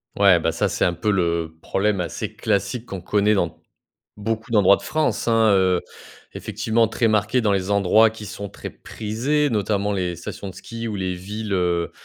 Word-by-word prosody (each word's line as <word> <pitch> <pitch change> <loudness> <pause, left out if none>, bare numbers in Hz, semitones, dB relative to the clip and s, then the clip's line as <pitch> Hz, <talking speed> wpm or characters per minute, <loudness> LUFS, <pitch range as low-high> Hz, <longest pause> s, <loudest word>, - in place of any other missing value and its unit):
Ouais, 100 -3 +5
bah, 80 - 0
ça 100 +5 0
c'est 100 - 0
un 85 - +1
peu 105 +5 0
le 85 -3 -1
problème 100 -1 0
assez 85 -3 -4
classique 110 +3 -1
qu'on 95 -3 -6
connaît 105 +3 +2
dans 85 -5 -2 0.6
beaucoup 110 +3 -3
d'endroits 100 -2 +6
de - - -12
France, 155 -5 -1
hein, 115 -1 +4
heu, 95 -2 +3 0.5
effectivement 115 +1 0
très 115 +1 0
marqués 110 +3 +2
dans 105 -3 +2
les 95 0 -1
endroits 100 +3 +5
qui 110 -1 -9
sont 100 0 -6
très - - -8
prisés. 130 +7 -1
Notamment 105 -1 0
les 90 -3 -1
stations 90 +3 -7
de 95 - -9
ski 115 +4 -7
ou 110 - -3
les 95 -2 -2
villes, 105 +3 -6
heu, 90 -2 0
100 Hz, 190 wpm, -22 LUFS, 90-110 Hz, 0.6 s, d'endroits